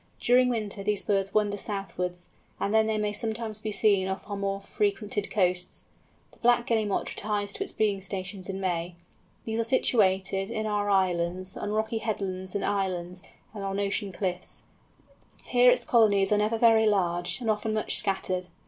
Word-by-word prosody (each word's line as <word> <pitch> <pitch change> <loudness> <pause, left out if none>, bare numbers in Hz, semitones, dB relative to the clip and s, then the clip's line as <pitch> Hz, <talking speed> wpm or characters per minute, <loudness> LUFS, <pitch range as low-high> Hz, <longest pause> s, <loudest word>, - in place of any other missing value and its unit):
During 250 +1 +4
winter 215 -4 -2
these 205 0 -1
birds 195 -1 0
wander 205 -1 +1
southwards, 180 -3 -4 0.3
and 200 - -1
then 220 0 +4
they 220 -1 0
may 210 -1 -1
sometimes 220 0 -2
be 215 0 -4
seen 200 -3 +3
off 190 +1 -4
our 205 - -4
more 195 0 -2
frequented 205 0 -1
coasts. 180 -3 0 0.4
The - - -21
Black 240 0 +3
Guillemot 215 -4 0
retires 205 -1 -2
to 395 - -2
its 395 - -4
breeding 205 -3 0
stations 190 0 -5
in 190 0 -3
May. 175 -2 -2 0.5
These 225 0 -2
are - - +2
situated, 195 -5 +2
in 220 0 -2
our 205 -1 0
islands, 185 -1 +1
on 210 - -4
rocky 220 +1 -1
headlands 190 -4 -3
and 200 - 0
islands, 180 -3 -2 0.3
and 205 -2 -6
on 195 0 -2
ocean 200 0 -1
cliffs. 180 -1 -4 0.8
Here 245 0 +5
its - - +3
colonies 205 -4 +4
are 210 - +4
never 215 +2 +1
very 225 -1 +5
large, 175 -3 +1
and 240 - -5
often 215 0 0
much 215 - 0
scattered. 185 -2 -1
205 Hz, 175 wpm, -27 LUFS, 190-220 Hz, 0.8 s, Here